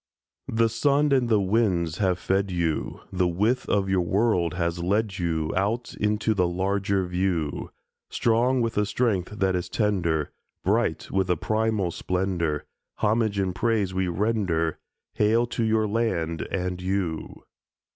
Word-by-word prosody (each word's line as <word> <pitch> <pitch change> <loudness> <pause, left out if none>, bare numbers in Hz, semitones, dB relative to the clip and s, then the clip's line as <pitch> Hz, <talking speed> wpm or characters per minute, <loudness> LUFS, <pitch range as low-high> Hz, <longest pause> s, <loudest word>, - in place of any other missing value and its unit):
The 115 0 +2
sun 140 +6 +2
and 130 -3 +3
the 110 -2 +4
winds 95 -5 +1
have 95 -3 +2
fed 95 +1 0
you; 85 -3 -2
The 90 -1 +1
width 105 +9 0
of 100 -1 +2
your 95 -1 +2
world 90 -2 +1
has 85 -1 -1
led 100 +2 0
you 80 -3 -1
Out 105 +6 -1
into 105 +1 0
the 90 -4 +2
larger 95 +2 0
view; 90 -4 -1 0.4
Strong 120 +3 +2
with 115 -2 0
a 105 - +1
strength 105 -6 0
that 95 -2 +1
is 90 0 -3
tender, 85 -9 0 0.3
Bright - - 0
with 95 -1 0
a 90 - +2
primal 110 -2 0
splendour, 90 -5 -1 0.3
Homage 110 -1 +1
and 95 -2 0
praise 105 -2 0
we 95 0 0
render— 90 -4 0 0.3
Hail 110 +3 +3
to 120 0 -2
your 110 -1 +2
land 90 -8 -1
and 90 -1 -2
you! 90 -4 -3
95 Hz, 145 wpm, -25 LUFS, 90-110 Hz, 0.4 s, the